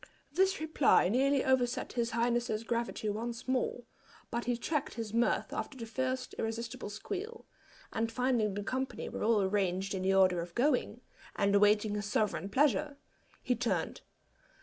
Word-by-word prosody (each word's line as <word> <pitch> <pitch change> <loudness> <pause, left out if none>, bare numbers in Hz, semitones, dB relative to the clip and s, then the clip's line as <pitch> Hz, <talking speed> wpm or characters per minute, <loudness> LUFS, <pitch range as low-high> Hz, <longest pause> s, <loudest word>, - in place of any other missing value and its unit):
This 380 +5 +2
reply 310 - +3
nearly 270 +4 +2
overset 255 -2 +1
his 235 -1 0
highness's 235 -1 0
gravity 235 -1 -2
once 230 +4 -3
more, 255 -1 0 0.5
but 235 +1 -2
he 245 -1 0
checked 295 +4 -2
his 225 -2 -5
mirth 235 +1 +1
after 270 - -4
the 230 - -5
first 255 +2 -2
irresistible 225 -1 -4
squeal; 410 - -6 0.5
and 225 0 -1
finding 235 -4 +1
the 205 - -3
company 260 +5 -3
were - - -6
all 215 -2 +3
arranged 190 -1 0
in 190 - -2
the 190 +1 +2
order 185 -2 +4
of 170 0 -8
going, 250 -3 +1 0.3
and 200 -1 +2
awaiting 210 +1 +4
his 205 -1 -3
sovereign 205 -2 0
pleasure, 290 +4 +2 0.5
he 250 - +1
turned. 240 0 -1
235 Hz, 155 wpm, -32 LUFS, 210-260 Hz, 0.5 s, order